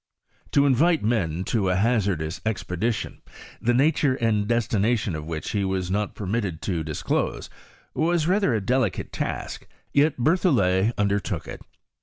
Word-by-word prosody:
To 140 - +5
invite 155 +5 +3
men 95 -7 0
to 100 -2 0
a 90 - +2
hazardous 95 -6 0
expeditioD, 110 0 -2 0.4
the 120 +1 +2
nature 145 0 +3
and 110 -5 0
destination 115 -3 +1
of 80 0 -5
which 80 -2 -4
he 100 -2 0
was 95 -1 -2
not 105 +1 -1
per 105 - -6
mitted 95 -5 -2
to 85 -5 -1
disclose, 80 -1 -2 0.4
was 165 0 +1
rather 195 -1 +2
a 110 - 0
delicate 120 0 0
task; - - -4 0.3
yet 145 +1 +3
fierthoUet 120 - +2
undertook 100 -1 -1
it. - - -8
110 Hz, 145 wpm, -24 LUFS, 95-130 Hz, 0.4 s, To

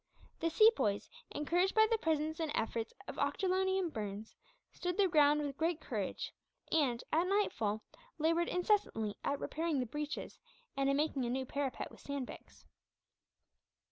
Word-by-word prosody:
The 330 - +1
Sepoys, 315 - +4 0.2
encouraged 350 +6 +1
by 440 0 +7
the 450 - +3
presence 315 -1 0
and 320 -2 -1
efforts 225 0 -1 0.2
of - - -6
Ochterlony 380 0 +1
and 355 -4 -1
Burns, 210 0 -5 0.4
stood 355 0 -3
their 400 -2 +5
ground 300 -3 +4
with 280 -2 -4
great 330 0 +1
courage - - -3 0.4
and, 260 -7 +2
at 335 +3 +3
nightfall, 225 - 0 0.3
laboured 330 +2 +2
incessantly 360 - +1
at 280 0 0
repairing 320 -2 -1
the 250 - 0
breaches, 295 +5 -5 0.4
and 275 0 +1
in 275 - +3
making 290 -4 0
a - - -1
new 260 +2 -1
parapet 275 0 -3
with - - -14
sandbags. 280 -3 -7
300 Hz, 150 wpm, -35 LUFS, 260-350 Hz, 0.4 s, by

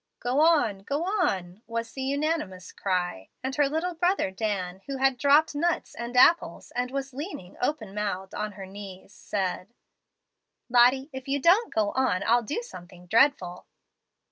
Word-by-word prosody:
"Go 250 +3 0
on, 300 -12 +3
go 280 +11 -2
on," 210 - -1
was 230 0 -4
the 265 - -6
unanimous 275 - -2
cry; 180 - -2
and 265 +1 -2
her 290 -2 +3
little 325 +4 -1
brother 350 - +1
Dan, 190 -3 -3
who 275 -1 -3
had 270 0 +3
dropped 285 +5 +4
nuts 335 +3 -1
and 235 +1 -5
apples 335 +7 +4
and 250 0 -2
was 275 0 -4
leaning 275 - -7
open 245 -8 -2
mouthed 200 -2 -3
on 210 -1 -3
her 195 -1 -8
knees, 195 0 -10
said, 195 +3 -4 0.9
"Lottie, 250 +4 +4
if 265 0 -7
you 280 +1 0
don't 375 - +4
go 210 -2 +1
on, 250 -8 +1
I'll 240 +2 +4
do 295 - -3
something 180 - -12
dreadful." 195 -4 +2
245 Hz, 160 wpm, -27 LUFS, 195-290 Hz, 0.9 s, dropped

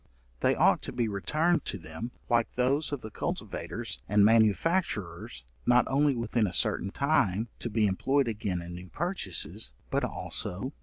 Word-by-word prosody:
They - - +3
ought - - +4
to - - -5
be 120 - 0
returned 155 - +1
to - - -3
them, 80 +7 -7 0.2
like 115 -1 +2
those 135 +5 +1
of 145 -3 -3
the 110 - -8
cultivators 65 - -4
and 105 0 +5
manufacturers, 105 - +1 0.2
not 125 0 +5
only 140 0 +2
within 115 -2 0
a 90 - -5
certain 95 - +1
time, 110 -5 +1
to 120 - -3
be 110 -1 +2
employed 135 +8 +1
again 100 -5 -2
in 85 0 -8
new 90 +1 -9
purchases, 100 - -1 0.2
but - - +1
also, 90 - -1
1. 130 +4 -4
115 Hz, 165 wpm, -29 LUFS, 95-135 Hz, 0.2 s, and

